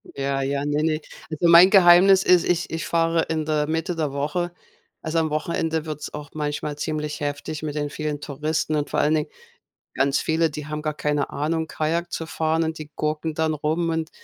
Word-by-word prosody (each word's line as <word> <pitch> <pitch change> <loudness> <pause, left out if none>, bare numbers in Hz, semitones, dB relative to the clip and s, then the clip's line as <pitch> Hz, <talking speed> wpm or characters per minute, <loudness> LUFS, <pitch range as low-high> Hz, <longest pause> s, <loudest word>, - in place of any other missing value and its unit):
Ja, 135 0 -1
ja, 140 +1 -1
ne, 150 +1 0
ne. 155 -1 0 0.3
Also 160 +2 0
mein 170 +3 +8
Geheimnis 190 0 +7
ist, 180 -2 +5
ich 175 -1 0
ich 160 -2 -4
fahre 165 0 +1
in 155 -1 -1
der 150 -1 0
Mitte 165 +2 -2
der 155 -4 -1
Woche. 150 +5 -2 0.5
Also, 160 +1 -2
am 160 -1 0
Wochenende 160 0 -1
wird's 150 -1 -6
auch 150 -1 -7
manchmal 150 -1 -3
ziemlich 150 0 -3
heftig 145 +2 -4
mit 150 -1 -4
den 145 -1 -2
vielen 150 -1 -4
Touristen 155 +2 -2
und 150 -1 -1
vor - - 0
allen 155 +1 +3
Dingen, 150 - -1 0.6
ganz 135 0 +1
viele, 160 0 +1
die 150 0 -7
haben 150 0 -4
gar 155 0 -2
keine 150 -1 -1
Ahnung, 160 +2 -2
Kajak 165 +3 -2
zu 165 - -3
fahren 160 0 0
und 160 0 -3
die 155 -1 -8
gurken 155 +1 -2
dann 160 -1 0
rum 155 +3 -1
und, 160 -1 -2
155 Hz, 200 wpm, -23 LUFS, 150-165 Hz, 0.6 s, mein